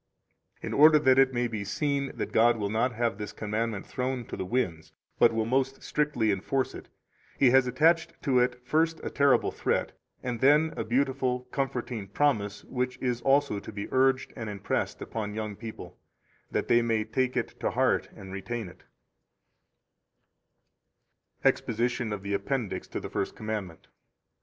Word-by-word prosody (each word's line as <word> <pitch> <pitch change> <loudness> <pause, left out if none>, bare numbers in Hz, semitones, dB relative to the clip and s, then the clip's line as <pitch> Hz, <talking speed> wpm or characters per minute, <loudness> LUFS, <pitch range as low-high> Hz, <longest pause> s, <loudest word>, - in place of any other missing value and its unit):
29 - - -6
In - - +1
order 155 0 +9
that 130 -3 +4
it 135 -1 +5
may 120 -1 0
be 110 -3 -4
seen 140 +6 -1
that - - -3
God 120 +1 +4
will 100 -2 -2
not 115 +4 +1
have 115 -2 -1
this 105 0 -5
commandment 110 0 -3
thrown 125 -1 -3
to - - -6
the 95 - -4
winds, 90 -9 -2 0.3
but 115 - +6
will 110 -1 0
most 135 +3 0
strictly 145 -8 +1
enforce 130 +7 -1
it, - - -10 0.5
He 130 -3 +5
has 130 0 +5
attached 160 +6 +2
to 130 -3 +3
it 125 0 0
first 160 +4 +1
a - - -4
terrible 140 -2 +3
threat, - - -1 0.3
and 125 -2 -3
then 150 +5 +4
a - - -2
beautiful, 130 0 0
comforting 125 -6 -3
promise 105 -3 0
which 125 0 -3
is 125 -2 -2
also 135 -4 +2
to - - -9
be 100 -1 -5
urged 130 0 +2
and 115 - -5
impressed 100 -1 -2
upon 105 -2 -4
young 110 -2 -4
people, 110 +1 -9 0.5
that - - -1
they 120 - +5
may 115 -2 +1
take 125 +3 -1
it 125 - -3
to - - 0
heart - - +1
and 95 0 -10
retain 100 +2 -4
it: - - -17 2.6
[Exposition 120 0 +1
of 100 -2 -4
the 100 0 -3
Appendix 120 0 -2
to - - -4
the - - -7
First - - -2
Commandment. 105 -6 -5
120 Hz, 170 wpm, -28 LUFS, 110-135 Hz, 2.6 s, order